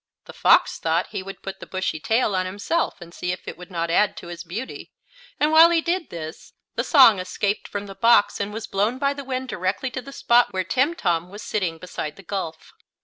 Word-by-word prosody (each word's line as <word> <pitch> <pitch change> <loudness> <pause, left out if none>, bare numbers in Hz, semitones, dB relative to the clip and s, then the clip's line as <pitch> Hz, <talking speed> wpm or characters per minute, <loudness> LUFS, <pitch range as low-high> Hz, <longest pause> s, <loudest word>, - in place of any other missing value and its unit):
The - - -11
fox - - +4
thought 165 +2 0
he - - -3
would 195 +1 -10
put 195 - -6
the - - -10
bushy 185 -4 -2
tail 220 +3 +1
on 185 0 0
himself 205 - -1
and 170 0 -11
see 180 0 -3
if 180 - -7
it - - -5
would 180 +1 -12
not 170 -2 -2
add 205 +4 +2
to 170 - -9
his 170 -1 -7
beauty, 200 +9 -7 0.5
and 300 +1 +3
while 325 +1 +8
he 340 -1 +3
did 340 +1 -1
this 160 -1 -8 0.2
the - - -1
song 255 - +7
escaped 200 +3 -2
from 205 0 -5
the 195 - -9
box 230 0 +4
and 200 0 -2
was 220 +1 -5
blown 210 +6 0
by 280 +1 +1
the 280 0 -7
wind 260 0 -3
directly 190 +8 -2
to 255 - -4
the 275 +3 -11
spot 240 -4 +3
where 185 0 0
Timtom 185 - 0
was 205 +2 -9
sitting 180 -6 -2
beside 155 -3 -6
the 195 - -14
gulf. 170 -4 -5
200 Hz, 225 wpm, -23 LUFS, 180-255 Hz, 0.5 s, while